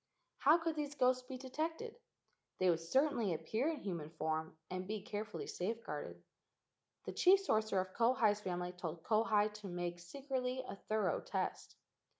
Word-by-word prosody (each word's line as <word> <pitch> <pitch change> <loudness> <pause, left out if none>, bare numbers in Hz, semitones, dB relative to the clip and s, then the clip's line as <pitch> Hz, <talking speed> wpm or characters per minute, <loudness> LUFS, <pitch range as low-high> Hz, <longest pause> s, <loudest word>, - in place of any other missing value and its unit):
How 300 +4 +7
could 330 -1 -1
these 290 -1 -3
ghosts 255 -1 +3
be 260 - -5
detected? 320 - -3 0.6
They 185 -1 +4
would 165 - +1
certainly 235 - +2
appear 220 - -1
in 320 -3 -1
human 170 -6 -4
form 160 0 -2
and 185 0 -3
be 215 +1 -2
carefully 215 -1 -4
safeguarded. 225 +5 -4 0.8
The - - -3
chief 380 +2 +6
sorcerer 215 - +2
of 185 0 -7
Kauhi's 230 -3 +3
family 180 -2 -2
told 170 -2 -6
Kauhi 215 -1 +3
to 210 -1 -8
make 175 -1 -3
secretly 260 +6 -3
a - - -5
thorough 210 -2 0
test. - - -3
215 Hz, 155 wpm, -37 LUFS, 180-260 Hz, 0.8 s, How